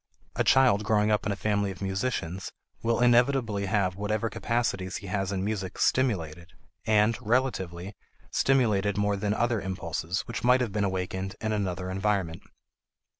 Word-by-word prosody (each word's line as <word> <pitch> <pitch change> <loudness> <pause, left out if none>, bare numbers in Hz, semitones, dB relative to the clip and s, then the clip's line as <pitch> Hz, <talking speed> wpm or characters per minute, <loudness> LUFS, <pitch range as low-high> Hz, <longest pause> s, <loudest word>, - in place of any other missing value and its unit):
A - - +1
child 125 -6 +4
growing 105 0 +2
up 105 - +1
in - - 0
a - - -1
family 100 0 0
of 95 - -7
musicians 95 -2 -3 0.3
will 115 +1 +1
inevitably 120 -4 +3
have 95 -2 +1
whatever 105 +3 -1
capacities 105 -6 -1
he - - -10
has 95 0 -2
in 95 -1 -2
music 100 -3 -3
stimulated, 85 -10 0 0.3
and, 110 +1 +4
relatively, 100 -6 -1 0.4
stimulated 105 -7 +2
more 105 0 +1
than 105 +1 -1
other 120 -2 +1
impulses 90 -1 -3
which 120 -3 -6
might 125 +1 +5
have 120 -4 -1
been 105 0 0
awakened 95 0 -3
in 110 - -2
another 95 -3 -2
environment. 95 -4 -1
100 Hz, 155 wpm, -27 LUFS, 95-115 Hz, 0.4 s, might